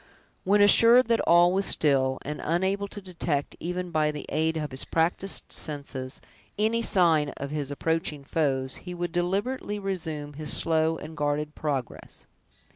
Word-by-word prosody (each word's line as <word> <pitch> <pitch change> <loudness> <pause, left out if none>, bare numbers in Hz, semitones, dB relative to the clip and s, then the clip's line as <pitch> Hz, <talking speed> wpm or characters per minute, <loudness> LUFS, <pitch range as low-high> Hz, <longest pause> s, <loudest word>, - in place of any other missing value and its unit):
When 205 +2 +3
assured 230 +4 +7
that 230 - +3
all 175 +1 +6
was 195 +1 +2
still, 130 -3 +2
and 150 +2 -5
unable 190 +5 0
to 205 - -9
detect, 165 -6 -3
even 180 +1 -4
by 155 -1 +2
the 150 -1 -5
aid 160 +1 0
of 150 -2 -4
his 130 - -1
practiced 175 +4 -1
senses, 140 -3 -3 0.4
any 220 +2 +1
sign 170 -9 +3
of 140 0 -5
his 145 -2 -3
approaching 150 0 -2
foes, 135 -3 -1
he 180 -1 -8
would 175 -1 -3
deliberately 200 +6 -2
resume 160 -7 -4
his 150 +1 -4
slow 160 0 +1
and 155 +1 -9
guarded 150 0 -1
progress. 140 -7 -5
160 Hz, 155 wpm, -26 LUFS, 145-185 Hz, 0.4 s, assured